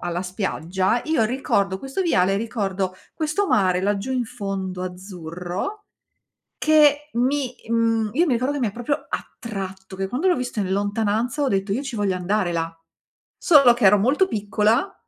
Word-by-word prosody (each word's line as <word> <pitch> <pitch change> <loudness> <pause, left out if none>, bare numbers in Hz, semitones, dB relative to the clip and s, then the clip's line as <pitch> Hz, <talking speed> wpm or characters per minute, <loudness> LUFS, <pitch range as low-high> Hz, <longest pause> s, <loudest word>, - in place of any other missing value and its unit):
alla 175 0 -2
spiaggia, 190 +2 -1
io 310 -8 +2
ricordo 200 -6 0
questo 270 - -3
viale, 195 - +2
ricordo 195 -4 -2 0.2
questo 320 +6 0
mare 185 - +2
laggiù 205 +6 -1
in 250 -2 0
fondo 195 -5 -4
azzurro 180 - -6 0.7
che 300 -1 +4
mi, 255 +1 0
mhmm, 225 -1 +2
io 330 +7 +3
mi 280 - +2
ricordo 255 +4 0
che 290 - -3
mi 235 - +1
ha - - -4
proprio 275 +6 -3
attratto, 190 -3 -6
che 195 0 -2
quando 290 - 0
l'ho 360 - +4
visto 245 -5 -4
in 190 - -1
lontananza 215 +7 0
ho - - +2
detto: 195 -2 0
"Io 250 +7 0
ci 270 -4 -5
voglio 200 -3 0
andare 185 0 0
là." 165 0 -2 0.6
Solo 280 -8 +6
che 240 -3 0
ero 200 +2 +7
molto 275 - +3
piccola 215 - +1
215 Hz, 165 wpm, -23 LUFS, 190-265 Hz, 0.7 s, ero